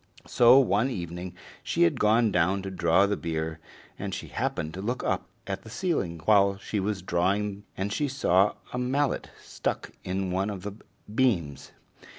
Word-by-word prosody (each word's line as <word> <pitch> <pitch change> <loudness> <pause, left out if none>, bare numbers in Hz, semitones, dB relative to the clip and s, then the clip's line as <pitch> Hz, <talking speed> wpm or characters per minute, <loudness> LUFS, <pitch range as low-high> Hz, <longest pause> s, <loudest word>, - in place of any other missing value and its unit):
So 120 +2 +6
one 120 -1 +3
evening 90 -4 -5 0.3
she - - +1
had 85 - +2
gone 110 +1 +4
down 95 +2 +1
to 95 - -5
draw 90 +1 +3
the 100 0 0
beer, 80 -2 -3 0.4
and - - -3
she - - -7
happened 80 0 -2
to 95 - -6
look 120 +5 -2
up - - -1 0.2
at 95 -1 -4
the 110 - -12
ceiling 110 - -1
while 100 -2 +4
she 100 +1 -3
was 100 -1 -2
drawing, 100 +3 0
and 100 +2 -2
she 145 +3 0
saw 105 -7 +2 0.2
a 125 - -1
mallet 135 +2 0
stuck - - -4
in 95 0 -2
one 95 +3 0
of 95 -3 -6
the 105 -1 -5 0.4
beams. 85 - 0
100 Hz, 170 wpm, -27 LUFS, 90-110 Hz, 0.4 s, So